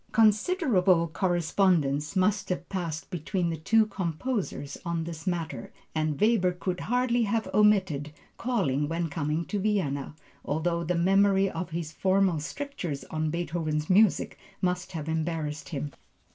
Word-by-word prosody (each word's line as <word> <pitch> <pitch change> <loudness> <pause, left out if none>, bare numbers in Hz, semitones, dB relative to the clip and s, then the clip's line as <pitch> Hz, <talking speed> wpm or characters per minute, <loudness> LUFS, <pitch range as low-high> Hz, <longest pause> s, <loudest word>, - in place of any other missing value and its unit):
Considerable 210 - +3
correspondence 160 -3 +1
must 195 +2 +1
have 180 - -2
passed 170 -4 -4
between 175 0 -1
the - - -2
two 220 +8 +3
composers 190 - -3
on 170 -2 -2
this 165 +1 -7
matter, 165 -9 -3 0.2
and 155 -2 -1
Weber 210 -5 +3
could 180 0 -3
hardly 245 0 +1
have 220 +1 0
omitted 190 -9 +3 0.2
calling 150 - 0
when 165 0 -1
coming 155 +2 -1
to 205 - -2
Vienna, 165 -9 -1 0.3
although 170 +3 -1
the 175 +2 0
memory 195 +2 +3
of 170 +2 -4
his 165 -2 -4
former 190 0 +2
strictures 175 - -5
on 155 0 -1
Beethoven's 155 -1 -2
music 205 +1 +3 0.2
must 180 0 -1
have 155 -2 -5
embarrassed 160 -2 -2
him. 145 -2 -4
175 Hz, 135 wpm, -28 LUFS, 155-195 Hz, 0.3 s, Considerable